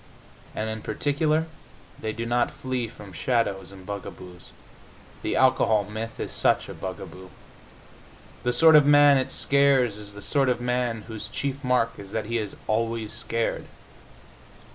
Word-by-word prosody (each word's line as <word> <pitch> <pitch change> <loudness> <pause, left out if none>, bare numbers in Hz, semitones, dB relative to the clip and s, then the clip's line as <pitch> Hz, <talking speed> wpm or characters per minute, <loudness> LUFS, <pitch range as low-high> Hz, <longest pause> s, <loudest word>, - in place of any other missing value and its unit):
And 110 - -2
in 110 0 -4
particular 150 +8 0 0.5
they 110 - -3
do 115 +1 -4
not 120 +1 +1
flee 130 -2 -3
from 105 -4 -12
shadows 100 -3 -1
and 95 -1 -13
bugaboos. 90 -3 -8 0.7
The - - -1
alcohol 125 -5 +4
myth 110 +2 -6
is - - -4
such - - +1
a - - -7
bugaboo. 95 0 -8 1.1
The 125 - +1
sort 160 +6 +6
of 150 -2 +7
man 145 -1 +7
it 130 - -3
scares 135 -6 +3
is 105 -1 -9
the 100 0 -10
sort 140 -3 +2
of 125 - +1
man 125 -2 -1
whose 110 -2 -7
chief 140 0 -4
mark 125 -2 +1
is 100 0 -10
that 110 -2 -2
he 115 +2 -1
is 105 -3 -5
always 115 0 -1
scared. 115 0 -2
115 Hz, 155 wpm, -25 LUFS, 105-130 Hz, 1.1 s, of